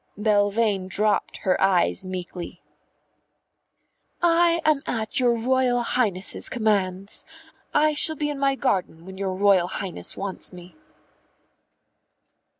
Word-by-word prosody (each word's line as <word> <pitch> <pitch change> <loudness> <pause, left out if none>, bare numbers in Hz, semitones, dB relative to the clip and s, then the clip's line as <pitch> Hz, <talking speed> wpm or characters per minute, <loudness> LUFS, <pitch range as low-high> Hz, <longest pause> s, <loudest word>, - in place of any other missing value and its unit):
Belvane 205 -1 +1
dropped 210 +2 0
her 185 - +1
eyes 190 0 +2
meekly. 180 -1 -7 1.6
"I 340 0 +3
am 305 -3 +3
at 220 0 -2
your 245 -2 +3
Royal 245 +1 +1
Highness's 205 -7 0
commands. 200 -4 -1 0.5
I 305 0 +3
shall 315 +2 +4
be 295 0 -2
in 285 - -6
my 275 -1 +2
garden 185 -10 -2
when 190 0 -10
your 190 -1 -2
Royal 195 -2 +3
Highness 190 0 -4
wants 195 -1 -4
me." 180 -2 -13
205 Hz, 115 wpm, -24 LUFS, 185-255 Hz, 1.6 s, shall